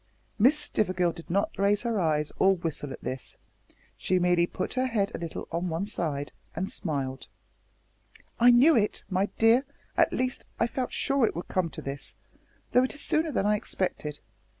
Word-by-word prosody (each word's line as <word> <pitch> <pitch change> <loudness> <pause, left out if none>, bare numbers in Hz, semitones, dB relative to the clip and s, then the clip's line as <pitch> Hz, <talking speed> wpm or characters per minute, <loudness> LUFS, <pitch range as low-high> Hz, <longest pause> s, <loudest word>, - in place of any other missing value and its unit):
Miss 260 +8 +5
Stivergill 185 - +1
did 170 - -11
not 200 +4 +1
raise 200 +1 +3
her 230 -3 0
eyes 150 -3 +1
or 195 0 +5
whistle 160 -5 -4
at - - -9
this. 130 -1 -6 0.6
She 185 - +1
merely 175 -1 +3
put 185 - -4
her 255 0 +1
head 210 -5 0
a - - -4
little 165 -1 -6
on 170 +2 -1
one 165 +4 -2
side 150 -8 -3 0.2
and 190 +4 -3
smiled. 135 -5 -3 1.1
"I 240 +1 +7
knew 260 +7 +7
it, 210 -2 +1
my 190 +2 +2
dear 225 +4 +5 0.3
at - - +4
least 255 0 -2
I - - +4
felt 250 +2 -3
sure 275 -4 +2
it - - -4
would 170 - -6
come 185 -3 0
to - - -9
this, 135 0 -6 0.6
though 250 - +5
it 260 - -2
is 290 - -1
sooner 315 0 +2
than 215 - 0
I 210 0 +3
expected. 150 -7 -3
190 Hz, 185 wpm, -28 LUFS, 165-235 Hz, 1.1 s, I